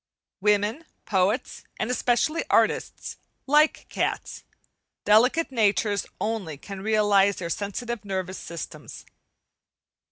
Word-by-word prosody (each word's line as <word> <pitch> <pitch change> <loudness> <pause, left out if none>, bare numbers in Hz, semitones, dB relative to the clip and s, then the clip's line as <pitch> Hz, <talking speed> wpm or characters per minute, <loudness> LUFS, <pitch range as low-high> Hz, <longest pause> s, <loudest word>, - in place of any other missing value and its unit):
Women, 210 - +1 0.2
poets, 200 +5 0 0.2
and 225 - -1
especially 250 +6 +1
artists, - - +1 0.3
like 300 +2 +3
cats; - - -3 0.6
delicate 250 +10 +4
natures 210 -3 +1
only 210 -9 -3
can 195 +5 -8
realize 205 -2 +3
their 170 -2 -5
sensitive 215 +5 -4
nervous 190 -2 -4
systems. 170 -1 -8
210 Hz, 95 wpm, -25 LUFS, 195-240 Hz, 0.6 s, delicate